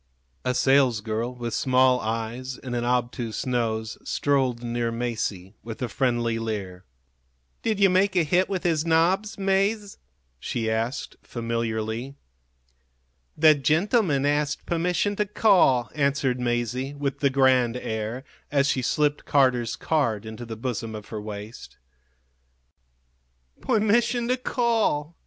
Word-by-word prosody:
A 125 0 0
salesgirl, 120 -4 +2
with 120 -1 -4
small 130 -1 +3
eyes 115 +3 -4
and 125 -2 -6
an 120 - -1
obtuse 120 -2 -1
nose, 110 -3 -2
strolled 130 -4 0
near 120 0 -1
Masie, 110 -5 -3
with 115 -1 -7
a - - 0
friendly 120 -2 0
leer. 100 -5 -5 0.8
"Did 220 -3 -1
you 200 - +6
make 190 +1 +2
a 175 - +4
hit 180 +4 +2
with 190 -3 -2
his 165 -4 +1
nobs, 180 +6 +2
Mase?" 200 +2 0 0.4
she 110 - -2
asked, 115 +4 -3
familiarly. 115 +2 -3 1.2
"The 155 0 +7
gentleman 155 - +2
asked 145 0 0
permission 180 +4 0
to 210 - +1
call," 175 - +3
answered 140 -3 0
Masie, 125 +3 -2
with 140 -1 -3
the 140 - +3
grand 130 -3 +3
air, 110 +2 -4 0.3
as 140 -1 +3
she 135 -2 +1
slipped 145 +3 0
Carter's 130 -4 +2
card 115 -10 0
into 110 +2 -8
the 110 -1 -6
bosom 115 -2 -4
of 105 -1 -9
her 110 -2 -5
waist. 105 +2 -9 1.8
"Permission 235 +1 +2
to 255 - +2
call!" 225 - 0
130 Hz, 130 wpm, -25 LUFS, 115-160 Hz, 1.8 s, The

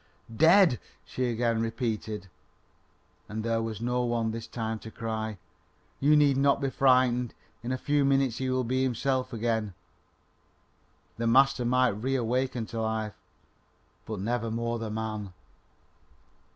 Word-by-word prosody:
"Dead!" 165 - +6 0.3
she 130 - -2
again 115 -1 0
repeated. 110 -3 -3 1.0
And 110 +1 -4
there 115 0 0
was 115 -1 -4
no 125 +1 0
one 120 -2 0
this 115 0 -6
time 110 -1 -3
to 110 - -9
cry: 110 -1 -4 0.6
"You 150 +2 +5
need 145 -3 +4
not 140 +1 +3
be 135 -2 -1
frightened; 125 -3 +3 0.3
in 120 - -4
a 130 - 0
few 145 +2 +1
minutes 135 -3 +2
he 130 0 -1
will 130 0 +1
be 130 +2 0
himself 130 0 0
again." 110 -4 -1 1.4
The 115 0 -1
master 135 +1 +4
might 125 +1 +3
reawaken 125 +2 -1
to 115 - -2
life, 110 -1 -2 0.9
but 110 -3 -4
never 115 +3 -1
more 115 +1 -2
the 110 -1 -4
man. 110 -3 -4
120 Hz, 140 wpm, -28 LUFS, 110-130 Hz, 1.4 s, Dead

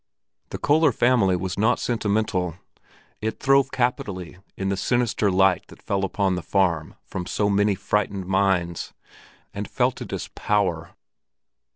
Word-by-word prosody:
The - - -5
Köller 155 0 +3
family 115 -6 +3
was 90 +1 -3
not 110 +4 +3
sentimental; 100 -6 0 0.7
it 110 +1 -3
throve 135 0 +4
capitally 100 -9 -2 0.2
in 95 0 -2
the 100 - +1
sinister 115 0 +1
light 95 0 +3
that - - -15
fell 100 -1 -2
upon 95 0 0
the 90 - -2
farm 85 -3 0
from 90 -1 -5
so 105 -1 0
many 100 0 +2
frightened 100 0 -1
minds, 95 -3 0 0.6
and - - -5
felt - - 0
it - - -7
as - - -4
power. 95 -6 -1
100 Hz, 145 wpm, -24 LUFS, 90-110 Hz, 0.7 s, throve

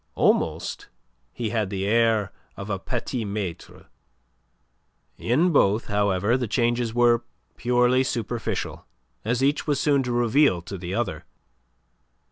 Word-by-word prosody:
Almost - - 0 0.4
he 115 -3 -4
had 110 -4 0
the 95 -1 -3
air 110 -1 +2 0.3
of 100 +2 -6
a 95 - -2
petit 120 +3 -3
maitre. 100 -4 -6 1.3
In 155 +10 +2
both, 110 -6 +3
however, 100 +1 +1
the 125 -2 -2
changes 120 +1 0
were 120 0 +3 0.3
purely 125 +1 +2
superficial, 120 -2 -3 0.4
as 120 +4 0
each 145 +3 +1
was 145 -2 +1
soon 140 -1 +3
to 125 -2 -3
reveal 120 - +3
to 95 +2 -7
the 90 +1 -4
other. 95 -8 -2
115 Hz, 125 wpm, -24 LUFS, 100-125 Hz, 1.3 s, both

